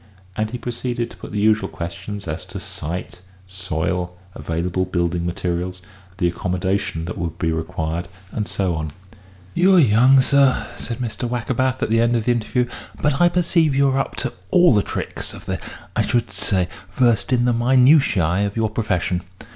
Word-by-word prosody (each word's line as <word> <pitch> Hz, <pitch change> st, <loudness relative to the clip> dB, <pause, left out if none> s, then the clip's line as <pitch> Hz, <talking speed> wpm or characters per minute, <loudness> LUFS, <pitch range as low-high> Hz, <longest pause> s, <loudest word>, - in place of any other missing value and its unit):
And 110 Hz, 0 st, -1 dB
he 125 Hz, -, -4 dB
proceeded 120 Hz, 0 st, -3 dB
to -, -, -13 dB
put -, -, -9 dB
the 105 Hz, -, -2 dB
usual 110 Hz, +1 st, +3 dB
questions 90 Hz, +4 st, -6 dB
as 75 Hz, +1 st, -4 dB
to -, -, -7 dB
site, 90 Hz, +3 st, -6 dB, 0.2 s
soil, 90 Hz, -1 st, -2 dB, 0.2 s
available 85 Hz, +3 st, -2 dB
building 85 Hz, -1 st, -1 dB
materials, 90 Hz, +1 st, -2 dB, 0.4 s
the 90 Hz, -4 st, +2 dB
accommodation 90 Hz, -1 st, -1 dB
that 90 Hz, -, -5 dB
would 85 Hz, -1 st, -3 dB
be 80 Hz, -1 st, 0 dB
required, 80 Hz, +1 st, -3 dB, 0.2 s
and 105 Hz, -2 st, -3 dB
so 95 Hz, -3 st, -1 dB
on. 80 Hz, -1 st, -3 dB, 0.6 s
"You're 185 Hz, +2 st, +5 dB
young, 130 Hz, -1 st, +6 dB
sir," 135 Hz, 0 st, +4 dB
said 115 Hz, -, -5 dB
Mr. 120 Hz, 0 st, -3 dB
Wackerbath, 130 Hz, +2 st, 0 dB
at -, -, -1 dB
the 115 Hz, 0 st, +4 dB
end 120 Hz, +1 st, +3 dB
of 115 Hz, -2 st, 0 dB
the 125 Hz, -, +3 dB
interview, 120 Hz, +1 st, 0 dB, 0.3 s
"but 145 Hz, 0 st, +1 dB
I 175 Hz, -, +6 dB
perceive 170 Hz, -4 st, +2 dB
you 140 Hz, 0 st, +4 dB
are 135 Hz, 0 st, +1 dB
up 135 Hz, -, -2 dB
to 125 Hz, -, -2 dB, 0.2 s
all 175 Hz, -5 st, +6 dB
the 105 Hz, -, +4 dB
tricks -, -, -4 dB
of -, -, -12 dB
the -, -, -2 dB, 0.4 s
I -, -, +3 dB
should 120 Hz, -5 st, 0 dB
say, 95 Hz, -1 st, +1 dB, 0.3 s
versed 120 Hz, -2 st, +2 dB
in 120 Hz, -1 st, +3 dB
the 125 Hz, -, +3 dB
minutiæ 120 Hz, -, +4 dB
of 100 Hz, -, -7 dB
your 110 Hz, -1 st, 0 dB
profession. 95 Hz, -5 st, 0 dB
105 Hz, 180 wpm, -21 LUFS, 90-125 Hz, 0.6 s, young